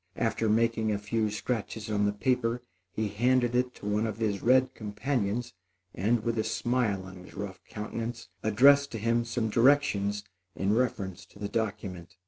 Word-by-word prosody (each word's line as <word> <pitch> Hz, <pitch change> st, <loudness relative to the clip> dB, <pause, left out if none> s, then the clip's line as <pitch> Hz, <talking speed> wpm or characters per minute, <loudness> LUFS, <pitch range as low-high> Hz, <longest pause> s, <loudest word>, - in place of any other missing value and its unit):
After 110 Hz, -, 0 dB
making 115 Hz, 0 st, +2 dB
a 105 Hz, -, +1 dB
few 105 Hz, +1 st, -1 dB
scratches 110 Hz, 0 st, -3 dB
on 105 Hz, -1 st, +2 dB
the -, -, +2 dB
paper, 120 Hz, +2 st, 0 dB, 0.3 s
he 110 Hz, 0 st, -1 dB
handed 120 Hz, +3 st, +2 dB
it 125 Hz, 0 st, +1 dB
to -, -, -11 dB
one 105 Hz, +2 st, +1 dB
of 110 Hz, -, -4 dB
his 105 Hz, -3 st, -1 dB
red 130 Hz, +2 st, +4 dB
companions, 110 Hz, +1 st, -2 dB, 0.4 s
and, 110 Hz, +4 st, +1 dB
with 115 Hz, 0 st, 0 dB
a -, -, +2 dB
smile 110 Hz, -3 st, 0 dB
on 95 Hz, 0 st, -10 dB
his 90 Hz, -, -13 dB
rough 95 Hz, -2 st, -6 dB
countenance, 115 Hz, +2 st, -5 dB
addressed 140 Hz, +7 st, +5 dB
to -, -, -2 dB
him 115 Hz, +2 st, +1 dB
some 115 Hz, -1 st, -1 dB
directions 115 Hz, -6 st, +3 dB, 0.3 s
in 95 Hz, +2 st, +1 dB
reference 105 Hz, -6 st, -1 dB
to -, -, -18 dB
the 100 Hz, 0 st, -3 dB
document. 95 Hz, -6 st, -3 dB
110 Hz, 170 wpm, -29 LUFS, 105-120 Hz, 0.4 s, addressed